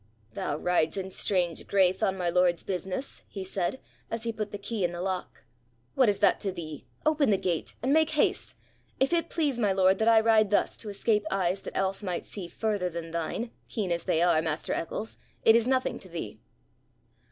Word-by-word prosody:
'Thou 145 - -2
rides 175 0 +1
in 190 0 -4
strange 180 -4 0
graith 190 -1 +3
on 190 0 +1
my 180 -2 -1
lord's 175 0 +2
business,' 190 +6 -4
he 195 - -6
said, 190 +5 -2 0.3
as 230 -1 -3
he 230 -1 -2
put 215 -1 -3
the 205 - -4
key 200 0 -3
in 175 - +2
the 175 0 -6
lock. 185 0 -4 0.5
'What 255 -4 +4
is 200 - +1
that 200 0 +3
to 195 - -2
thee? 160 -5 -8 0.2
Open 305 -4 +3
the 200 - +4
gate. 175 -4 -2
And 265 +3 +2
make 315 0 +4
haste. 305 -2 +1 0.4
If 270 +5 +2
it 335 -1 +1
please 290 -7 0
my 210 -4 +3
lord 190 0 +4
that 220 - +2
I 225 -1 +7
ride 220 -2 +4
thus 205 - +2
to 215 - -6
escape 210 +1 +1
eyes 190 0 0
that - - -6
else 195 +1 0
might 180 -4 -3
see 190 -4 -7
further 205 0 -1
than 165 -1 -6
thine, 170 +8 -3 0.2
keen 205 -6 -2
as 170 -1 -1
they 165 - +2
are, 175 -3 +4
master 160 -1 -2
Eccles, 210 +6 -4 0.3
it 225 - +8
is 230 0 +3
nothing 260 0 +1
to - - -11
thee.' - - -6
195 Hz, 210 wpm, -28 LUFS, 180-225 Hz, 0.5 s, it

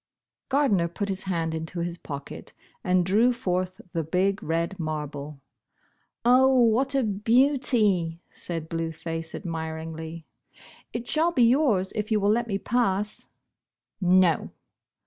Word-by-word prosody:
Gardner 260 -11 +2
put 200 +4 -4
his 190 0 -4
hand 165 -3 -1
into 160 +2 -4
his 170 0 -4
pocket 140 -2 -8 0.3
and 180 -1 +2
drew 215 +7 +4
forth 185 -6 -2
the 165 - -1
big 185 +5 0
red 170 +4 -2
marble. 150 -2 -5 0.4
" - - -43
Oh, 260 +1 +5
what 245 +4 +3
a 270 - +3
beauty," 215 - +2
said 165 -2 -5
Blue 165 0 -3
Face 165 0 -5
ad - - -7
miringly. 160 0 -5 0.3
" - - -20
It 235 0 -5
shall 325 +3 +3
be 255 -7 +3
yours, 230 -7 +3
if 215 0 -4
you 215 - +3
will 200 +1 +2
let 235 +2 +1
me 200 -3 -1
pass." 210 -2 -1 0.7
"No." 180 -2 +3
185 Hz, 145 wpm, -26 LUFS, 165-230 Hz, 0.7 s, Oh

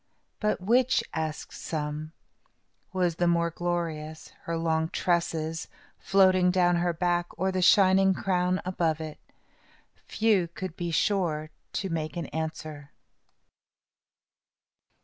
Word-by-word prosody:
"But 210 -1 0
which," 245 +6 +3
asked 155 -1 -4
some, 155 0 -4 0.8
"was 180 -3 0
the 175 - +2
more 170 0 +2
glorious, 160 -3 -3 0.2
her 165 0 -2
long 160 -1 0
tresses, 165 -3 -1 0.3
floating 185 0 +4
down 175 -1 +3
her 175 0 +1
back, 175 +1 0
or 190 +1 0
the 185 0 -1
shining 190 +1 +5
crown 185 -1 0
above 165 -4 0
it?" 155 -1 -7 0.9
Few 210 -6 +2
could 170 0 -7
be 175 -2 -3
sure 165 -3 0 0.3
in 190 -3 -3
making 160 +1 -3
answer. 155 -2 -5
170 Hz, 110 wpm, -27 LUFS, 160-185 Hz, 0.9 s, shining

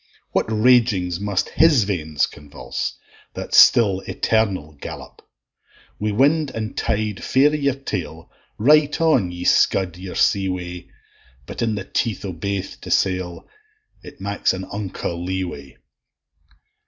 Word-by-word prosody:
What - - 0
ragings 110 -6 +3
must 100 -2 -1
his 155 -8 +4
veins 80 -7 -1
convulse, 70 -4 -6 0.4
That - - -6
still 100 -5 +6
eternal 100 -9 0
gallop! - - -9 0.8
Wi' 105 - -1
wind 145 +7 +2
and 110 -1 -4
tide 105 -1 -2
fair 140 +3 +3
i' - - -6
your 140 -3 0
tail, 135 0 -6 0.3
Right 150 +5 +4
on 155 - +3
ye 90 0 -7
scud 90 -1 +2
your 95 -1 -7
sea 95 -2 +2
way; 90 -1 -6 0.6
But - - -7
in 115 -2 0
the 95 -2 -5
teeth 110 0 -2
o' 95 - -4
baith 100 +3 -4
to - - -9
sail, 90 -2 -1 0.5
It - - -13
maks 100 0 0
a 95 0 -6
unco 100 -4 -4
lee 95 +2 -3
way. 70 -7 -8
100 Hz, 140 wpm, -21 LUFS, 90-115 Hz, 0.8 s, still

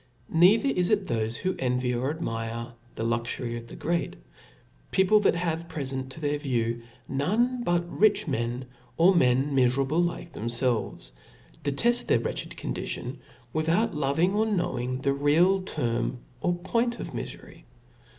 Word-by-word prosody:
Neither 195 +10 +5
is 180 -8 +1
it 205 -3 +2
thofe 115 -6 -1
who 185 0 -1
envy 125 -1 0
or 125 +4 0
2idmire 115 -5 -4 0.2
the - - -3
luxury 120 +1 -2
of 115 0 -7
the - - -10
great; 170 +2 -1 0.7
people 190 +3 +4
that 205 - +3
have» 170 -1 -2
prefent 130 -3 -3
to 160 - -9
their 145 -1 -1
view 120 -4 -1 0.3
none 225 - +1
but 175 -3 +1
rich 210 +2 +2
men, 120 -1 -2 0.3
or 175 +4 +6
men 135 -2 +3
miferable 135 +5 +3
like 170 0 -3
themfelves, 115 - -2 0.5
deteft 235 - +2
their - - +4
wretched - - -4
condition, - - -4 0.3
without 165 +8 +1
loving 150 +5 +1
or 215 +2 +2
knowing 130 - -1
the 140 0 +2
real 165 +7 +3
term 120 -8 -1 0.2
or 175 +4 +1
point 230 +7 -1
of - - -5
mifery. - - -8
145 Hz, 145 wpm, -27 LUFS, 125-180 Hz, 0.7 s, or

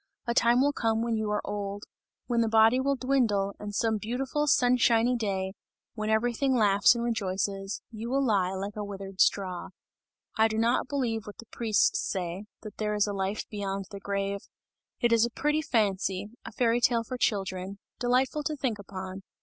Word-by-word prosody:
A 235 - 0
time 235 +1 +4
will 285 +1 +3
come 225 -2 0
when 235 -1 0
you 220 -1 -1
are 210 - -1
old, 205 0 -4 0.4
when 235 -2 +1
the 225 - +1
body 225 +3 +5
will 275 +1 +1
dwindle 235 -7 +1
and 205 -1 -6
some 220 -1 +1
beautiful 265 +7 -2
sunshiny 245 -2 +4
day, 190 -4 -2 0.4
when 215 -1 -3
everything 245 +4 +1
laughs 205 -1 +5
and 235 - -2
rejoices, 195 -3 -2
you 225 +1 -6
will 275 +1 +1
lie 195 -6 +2
like 200 +2 -4
a 210 - -3
withered 195 -1 -5
straw! 185 -3 +1 0.7
I 220 - +6
do 220 0 -3
not 235 +3 +2
believe 235 -6 -2
what 205 - -9
the 230 - -11
priests 220 -1 +1
say, 185 +1 -3 0.2
that 215 -2 -9
there 210 -1 -1
is 210 - +3
a 205 - -3
life 195 +2 -2
beyond 195 -2 -4
the 200 - -7
grave! 200 0 -2 0.6
It 240 -1 +3
is 230 -1 +5
a 235 - +2
pretty 300 +5 0
fancy, 200 -6 0
a - - -8
fairy 240 -1 +1
tale 235 -1 +3
for 255 - -6
children, 195 -3 -1 0.2
delightful 255 +4 +1
to 305 - -1
think 250 -7 -2
upon. 190 -1 -7
220 Hz, 185 wpm, -28 LUFS, 200-240 Hz, 0.7 s, I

